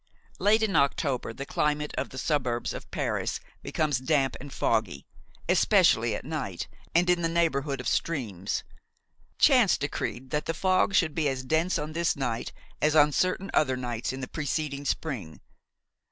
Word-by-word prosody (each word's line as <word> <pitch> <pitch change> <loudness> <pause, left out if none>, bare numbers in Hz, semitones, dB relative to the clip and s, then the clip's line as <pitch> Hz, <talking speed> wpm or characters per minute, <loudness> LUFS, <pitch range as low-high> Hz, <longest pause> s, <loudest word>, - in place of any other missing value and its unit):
Late 220 +2 +4
in 210 -3 0
October 140 -3 +1
the 140 +5 -6
climate 150 +1 -1
of - - -2
the 130 - -10
suburbs 125 -6 -1
of - - -8
Paris - - -2 0.2
becomes 150 -5 0
damp 135 -1 +1
and 140 +1 -9
foggy, 90 - 0 0.4
especially - - +4
at - - -7
night - - -4 0.3
and 175 +1 +4
in 180 -1 +3
the 165 - +1
neighborhood 150 -5 0
of 125 - -4
streams. 105 - -1 0.7
Chance - - +5
decreed 130 +2 -4
that 150 0 -1
the 165 - -1
fog 185 +2 +2
should 170 -6 +3
be 155 -3 +1
as 130 -1 -3
dense 160 +7 +1
on 150 +1 -4
this 170 +1 +1
night 120 -4 -3 0.3
as 155 +1 +3
on 150 -1 +6
certain 185 +5 0
other 130 -4 +2
nights 120 -2 -3
in 130 +1 -6
the 130 - -4
preceding 145 -1 -3
spring. 115 - -3
145 Hz, 165 wpm, -27 LUFS, 130-165 Hz, 0.7 s, on